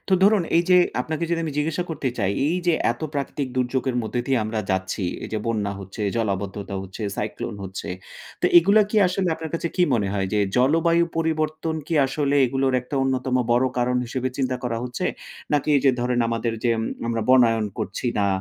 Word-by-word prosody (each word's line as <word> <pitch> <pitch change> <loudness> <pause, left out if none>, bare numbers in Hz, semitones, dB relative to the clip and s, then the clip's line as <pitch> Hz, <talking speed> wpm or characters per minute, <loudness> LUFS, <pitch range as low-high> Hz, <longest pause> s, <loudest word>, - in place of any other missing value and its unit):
তো - - 0
ধরুন 205 -1 +5
এই 170 - +5
যে, 180 - +7 0.2
আপনাকে 155 +5 -2
যদি 170 -1 +1
আমি 155 - -3
জিজ্ঞাসা 155 +3 0
করতে 145 -4 -2
চাই, 100 -2 +1 0.2
এই 170 +4 +1
যে 175 - +4 0.2
এত - - -16
প্রাকৃতিক 140 -1 -2
দুর্যোগের 125 0 0
মধ্যে 120 +2 -2
দিয়ে 135 -2 +2
আমরা 110 0 -2
যাচ্ছি। 95 +1 -1 0.2
এই - - -6
যে 110 - 0
বন্যা 105 -3 -1
হচ্ছে, 100 +3 -7
জলাবদ্ধতা 100 -2 -2
হচ্ছে, 95 +3 -8
সাইক্লোন 105 +1 -4
হচ্ছে। 95 0 -6 0.5
তো - - +3
এগুলা 200 +5 +5
কি 220 - -1
আসলে 180 0 0
আপনার 160 -1 -7
কাছে 165 0 -1
কি 180 - +4
মনে 105 -4 0
হয়? 95 -2 -1
যে 105 - +2 0.2
জলবায়ু 165 +6 +3
পরিবর্তন 160 0 -1
কি 165 - -2
আসলে 140 +1 0
এগুলোর 135 +1 0
একটা 125 +4 -8
অন্যতম 130 -1 0 0.2
বড় 125 +2 +3
কারণ 125 +1 +1
হিসেবে 130 +2 -2
চিন্তা 130 -2 0
করা 120 -2 -2
হচ্ছে? 125 -1 -4 0.5
নাকি 145 +1 +1
যে 135 - +7
ধরেন, 125 0 0
আমাদের 115 0 -1
যে 120 - +3 0.4
আমরা 115 -1 -1
বনায়ন 115 -4 +4
করছি 100 +6 -3
না 100 - +2
130 Hz, 190 wpm, -23 LUFS, 110-155 Hz, 0.5 s, যে